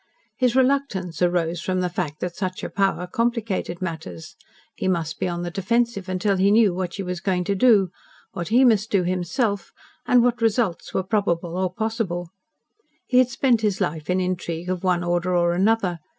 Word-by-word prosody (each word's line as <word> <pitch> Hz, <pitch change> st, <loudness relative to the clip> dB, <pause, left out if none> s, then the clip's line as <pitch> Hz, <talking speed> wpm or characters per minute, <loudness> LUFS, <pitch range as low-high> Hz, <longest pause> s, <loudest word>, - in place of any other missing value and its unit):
His 250 Hz, -2 st, +1 dB
reluctance 255 Hz, -, +1 dB
arose 175 Hz, -1 st, +1 dB
from 185 Hz, 0 st, -1 dB
the 180 Hz, -, +1 dB
fact 175 Hz, -4 st, -4 dB
that 175 Hz, -1 st, -3 dB
such 185 Hz, -1 st, -4 dB
a -, -, -4 dB
power 195 Hz, -2 st, 0 dB
complicated 220 Hz, -4 st, -2 dB
matters. 160 Hz, -, -6 dB, 0.4 s
He -, -, -3 dB
must 170 Hz, -4 st, -1 dB
be -, -, 0 dB
on 175 Hz, 0 st, -3 dB
the 175 Hz, -, -4 dB
defensive 200 Hz, +1 st, 0 dB
until 190 Hz, +2 st, 0 dB
he 195 Hz, +2 st, +3 dB
knew 210 Hz, -2 st, +4 dB
what 180 Hz, -1 st, -3 dB
she 200 Hz, -, -4 dB
was 180 Hz, -1 st, -4 dB
going 185 Hz, -2 st, 0 dB
to 200 Hz, +3 st, 0 dB
do, 200 Hz, -3 st, +4 dB, 0.4 s
what 175 Hz, -6 st, -5 dB
he 245 Hz, +4 st, +5 dB
must 220 Hz, -3 st, +3 dB
do 195 Hz, -3 st, +2 dB
himself, 185 Hz, +3 st, -1 dB, 0.4 s
and 245 Hz, -1 st, +5 dB
what 245 Hz, -1 st, +1 dB
results 225 Hz, -5 st, 0 dB
were 190 Hz, -, -1 dB
probable 180 Hz, -4 st, -1 dB
or 185 Hz, -1 st, 0 dB
possible. 195 Hz, -5 st, -3 dB, 0.8 s
He 250 Hz, -, +3 dB
had 255 Hz, -1 st, +4 dB
spent 240 Hz, -2 st, +2 dB
his 205 Hz, -3 st, 0 dB
life 155 Hz, +1 st, -2 dB
in 180 Hz, +1 st, +2 dB
intrigue 180 Hz, -2 st, -3 dB
of 185 Hz, 0 st, -3 dB
one 180 Hz, -2 st, +1 dB
order 175 Hz, +1 st, 0 dB
or 175 Hz, 0 st, +2 dB
another. 190 Hz, -2 st, +1 dB
185 Hz, 190 wpm, -23 LUFS, 175-220 Hz, 0.8 s, he